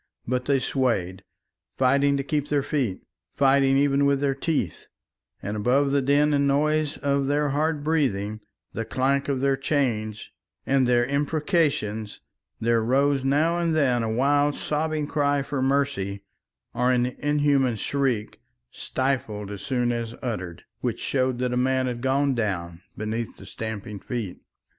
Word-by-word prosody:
But 125 +1 -1
they 140 0 +3
swayed, 115 -9 -1 0.5
fighting 140 +2 +3
to 135 - -2
keep 145 0 -1
their 145 -2 +1
feet, 130 -12 -2 0.3
fighting 135 -1 +4
even 140 0 +3
with 140 -1 +2
their 140 -1 +1
teeth, 140 - -2 0.6
and 105 +2 -3
above 130 +6 +2
the 140 0 +2
din 145 +3 +3
and 140 -1 +2
noise 150 +1 +1
of 140 -1 0
their 145 +1 +1
hard 150 +1 0
breathing, 110 -10 0 0.3
the 115 - -2
clank 135 +4 0
of 135 -2 0
their 135 0 +3
chains, 125 -7 -1 0.3
and 135 -2 +2
their 120 -1 +3
imprecations, 140 - 0 0.4
there 115 0 +2
rose 135 +4 +2
now 155 +6 +2
and 165 -2 +1
then 130 -6 +2
a 115 - -1
wild 145 +5 +2
sobbing 155 0 -1
cry 145 -2 +1
for 135 -1 -3
mercy, 130 -8 0 0.5
or 125 +2 +1
an 125 -1 +3
inhuman 145 -4 +2
shriek, 125 -2 -2 0.3
stifled 110 -7 -2
as 100 - -7
soon 125 -3 0
as 115 -1 -3
uttered, 90 -9 -4 0.2
which - - -2
showed 130 -2 0
that 125 0 -1
a - - 0
man 130 +1 +2
had 120 -2 -3
gone 135 +2 +2
down 90 -7 -3 0.2
beneath 110 +2 -4
the - - -12
stamping 110 -2 -6
feet. 110 -4 -5
135 Hz, 150 wpm, -25 LUFS, 115-145 Hz, 0.6 s, fighting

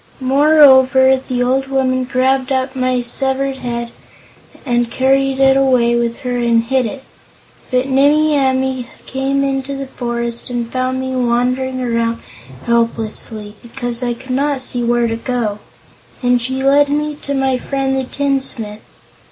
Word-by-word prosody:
Moreover, 265 -1 +5
the 245 -2 0
old 265 +2 0
woman 260 -1 0
grabbed 260 +1 0
up 260 0 -1
my 255 -1 0
severed 265 +2 -1
head 235 -2 -4 0.7
and 240 -2 0
carried 270 +1 +1
it 270 0 +5
away 255 -3 +3
with 235 0 -2
her 245 -1 -2
and 235 -1 +2
hid 255 0 0
it. 265 +5 -8 0.7
But 255 0 0
Nimmie 295 +3 +3
Amee 265 -2 0 0.2
came 270 +1 -1
into 275 0 -2
the 275 0 -5
forest 235 -2 -4
and 240 -1 -3
found 255 0 -1
me 260 0 -3
wandering 255 +1 0
around 230 -1 0 0.5
helplessly, 225 -2 -1
because 240 0 -4
I 240 -1 -1
could 260 +2 -10
not 280 +1 0
see 245 -1 -2
where 240 0 +1
to 225 -1 -1
go, 230 -3 -3 0.6
and 245 0 +2
she 260 +2 -3
led 285 +1 +4
me 300 +1 -1
to 280 - -3
my 265 -1 0
friend 270 0 -2
the 265 - -1
tinsmith. 260 -6 -3
260 Hz, 150 wpm, -16 LUFS, 240-270 Hz, 0.7 s, Moreover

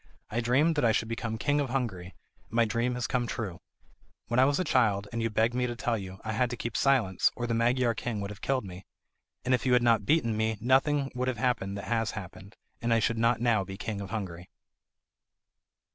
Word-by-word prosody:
I 120 - 0
dreamed 140 +8 +3
that 145 - +2
I 115 -2 +4
should 110 +1 0
become 115 -1 -3
King 145 +6 +1
of 140 -3 -1
Hungary, 105 -9 -3 0.3
and - - -19
my 115 -1 +4
dream 115 +3 0
has 125 0 -2
come 125 -3 0
true. 95 -7 -5 0.7
When 120 +2 +2
I 130 - +7
was 145 +3 +2
a - - +2
child, 110 - +2
and 115 - -2
you 115 - 0
begged 110 +2 +1
me 125 0 0
to 120 - -4
tell 120 0 -1
you, 95 -3 -6
I 110 - -3
had 120 +3 +1
to 120 - -5
keep 115 0 -4
silence, 120 -10 +3
or 120 - -3
the 120 - -1
Magyar 120 +1 +2
king 115 -2 -4
would 100 0 -4
have 100 -1 -11
killed 130 -5 0
me. 90 0 -10 0.6
And 130 - +2
if 125 - +2
you 130 - +2
had 125 -1 +4
not 115 -4 +3
beaten 120 -8 +2
me 110 0 0
nothing 135 +3 +2
would 125 0 -2
have 130 -3 -1
happened 105 -5 -1
that 100 - -6
has 115 -1 0
happened, 95 0 -9 0.3
and 115 - 0
I 115 - +5
should 115 +1 +1
not 115 0 +2
now 115 -5 +3
be 95 0 -8
King 105 -1 -4
of 100 - -6
Hungary." 90 -5 -5
115 Hz, 235 wpm, -29 LUFS, 105-125 Hz, 0.7 s, I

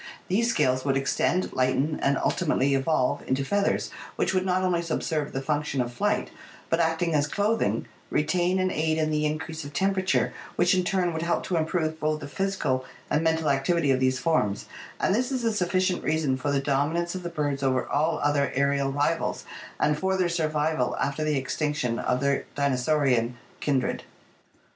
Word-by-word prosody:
These 230 +6 +2
scales 130 - +2
would 135 -1 +1
extend, 155 +6 0
lighten, 135 +4 +1
and 140 0 +2
ultimately 140 -5 +1
evolve 135 -1 +1
into 135 +1 0
feathers 200 +5 0 0.2
which - - 0
would 185 0 +1
not 185 0 +1
only 180 -2 +1
subserve 160 -2 -2
the 135 - -3
function 150 -1 -1
of 120 -1 -1
flight 120 - 0 0.4
but, 165 - +3
acting 165 0 +1
as 145 -1 +2
clothing, 210 +7 0 0.2
retain 175 +4 +1
and 185 0 +1
aid 160 -1 0
in 155 -1 +1
the 150 0 +1
increase 155 +1 -4
of 145 0 -9
temperature, 190 +3 +1 0.2
which - - +3
in 185 0 +2
turn 180 -2 0
would 160 - -3
help 170 +1 0
to 180 - -2
improve 160 -1 0
both 155 0 0
the 140 - -7
physical 145 -6 -1 0.3
and 155 - +2
mental 160 0 +1
activ 140 +5 +2
ity 150 -5 +2
of 130 - +2
these 130 0 +2
forms, 130 -8 0 0.3
and - - +2
this 245 +5 0
is 255 -2 -1
a 225 -1 +1
sufficient 185 -1 0
reason 155 -4 +1
for 140 +3 -2
the 140 - +2
dominance 150 +5 0
of 185 - -4
the 175 - -4
birds 145 -4 -2
over 130 -2 +1
all 155 +3 +1
other 145 -1 +2
aerial 140 0 +1
rivals 145 +4 -1 0.3
and 150 0 +2
for 190 +1 +1
their 180 -2 +1
survival 155 -4 0
after 145 +2 -1
the 155 -2 +1
extinction 135 -3 -1
of 125 +1 0
their 140 0 +1
dinosaurian 130 -3 +1 0.2
kindred. 135 -4 0
155 Hz, 185 wpm, -26 LUFS, 140-175 Hz, 0.4 s, but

